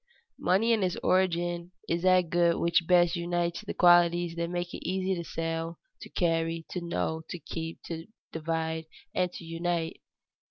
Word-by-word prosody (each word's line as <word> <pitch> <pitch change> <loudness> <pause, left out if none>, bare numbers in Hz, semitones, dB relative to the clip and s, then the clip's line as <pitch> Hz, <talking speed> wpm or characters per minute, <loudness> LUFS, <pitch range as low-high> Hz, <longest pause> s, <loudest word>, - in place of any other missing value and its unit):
_Money 200 +6 +3
in 220 - +2
its 185 -2 0
origin 175 -1 +1 0.2
is 170 0 0
that 185 -2 +4
good 170 -1 +4
which 170 0 +2
best 175 -1 +5
unites 175 +1 -1
the 215 - -5
qualities 175 -1 +5
that 170 0 -2
make 175 0 -3
it - - -4
easy 190 +2 0
to 170 -2 -3
sell, 165 0 -3 0.2
to - - -9
carry, 165 -1 0
to 180 - -3
know, 165 -1 -2
to - - -4
keep, 165 -1 -6
to 165 0 -6 0.2
divide, 160 0 -2 0.3
and 180 -1 +1
unite. 165 0 -2
170 Hz, 160 wpm, -29 LUFS, 165-175 Hz, 0.3 s, best